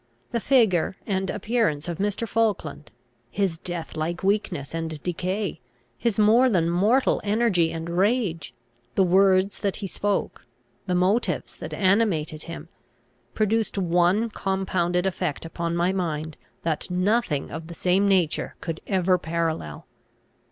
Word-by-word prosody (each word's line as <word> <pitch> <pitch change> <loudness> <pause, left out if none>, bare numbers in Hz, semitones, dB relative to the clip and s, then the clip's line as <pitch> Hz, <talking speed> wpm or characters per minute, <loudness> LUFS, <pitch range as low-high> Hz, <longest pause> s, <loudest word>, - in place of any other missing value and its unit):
The 235 - 0
figure 205 -7 +3
and 190 -2 -1
appearance 210 -8 0
of 170 0 -4
Mr. 205 +3 -1
Falkland, 205 -10 -1 0.4
his 185 +1 -1
death 175 -2 -6
like 170 +3 -3
weakness 190 -8 -1
and 165 -2 -3
decay, 185 +3 -2 0.4
his 235 -4 -1
more 225 +5 +5
than 170 -6 +2
mortal 215 +10 +3
energy 205 -6 +2
and 165 0 -5
rage, 185 - 0 0.4
the 195 - +4
words 190 +1 +3
that 200 -2 -1
he 205 - -5
spoke, 205 +2 -2 0.4
the 180 - +1
motives 190 +6 +1
that - - -7
animated 185 -7 +1
him, 170 - -8 0.7
produced 215 0 +1
one 180 +5 +2
compounded 190 -3 0
effect 180 -5 -2
upon 170 +1 -3
my 175 +2 +1
mind 160 -4 -2 0.3
that 160 0 -2
nothing 180 -4 0
of 160 0 -6
the 170 - -8
same 190 +4 +2
nature 185 -5 +1
could 165 -2 -5
ever 185 -2 +2
parallel. 165 -1 -3
185 Hz, 135 wpm, -25 LUFS, 170-205 Hz, 0.7 s, more